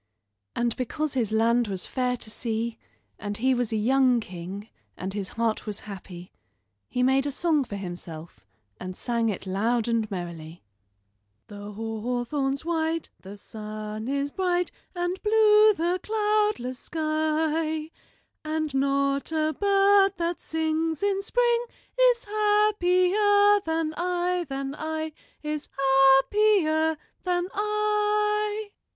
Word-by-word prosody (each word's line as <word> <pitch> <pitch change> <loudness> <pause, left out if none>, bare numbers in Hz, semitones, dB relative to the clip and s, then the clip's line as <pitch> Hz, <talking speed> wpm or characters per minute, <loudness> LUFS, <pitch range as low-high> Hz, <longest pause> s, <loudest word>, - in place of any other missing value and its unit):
And 240 -1 0
because 295 +4 -2
his 235 -5 0
land 230 +2 +3
was 190 -3 -3
fair 250 -1 -1
to 215 - -10
see, 230 0 -3 0.4
and 205 0 -4
he 260 +3 +2
was 245 -2 -1
a - - 0
young 255 +2 +3
king, 190 +1 -7 0.3
and 190 +1 -4
his 200 -2 -3
heart 230 -1 -1
was 210 -1 -4
happy, 185 -3 -9 0.6
he 250 - 0
made 265 +2 +3
a - - -1
song 310 0 +1
for 210 - -7
himself 175 -4 -8 0.4
and 185 0 -7
sang 235 -2 0
it 200 -2 -4
loud 220 +5 0
and 230 -2 0
merrily: 170 -3 -7 0.9
"The 205 0 -8
hawthorn's 245 +6 -2
white, 325 -1 -1
the 195 +2 -10
sun 215 +1 -7
is 280 +1 -1
bright, 360 -1 0 0.2
And 355 +1 -2
blue 430 0 +5
the 345 +2 0
cloudless 420 - 0
sky; 315 0 -1 0.5
And 310 -1 -2
not 275 +1 +1
a 310 -1 +1
bird 395 0 +4
that 340 0 -2
sings 320 +1 -1
in 395 -1 +1
spring 475 +3 +1 0.5
Is 470 0 -5
happier 410 -1 +3
than 320 -1 0
I, 355 -1 -1
than 275 0 -3
I, 315 +1 -4 0.3
Is 300 -1 -4
happier 310 +5 +4 0.2
than 360 0 -1
I." 420 0 0
300 Hz, 125 wpm, -26 LUFS, 230-360 Hz, 0.9 s, blue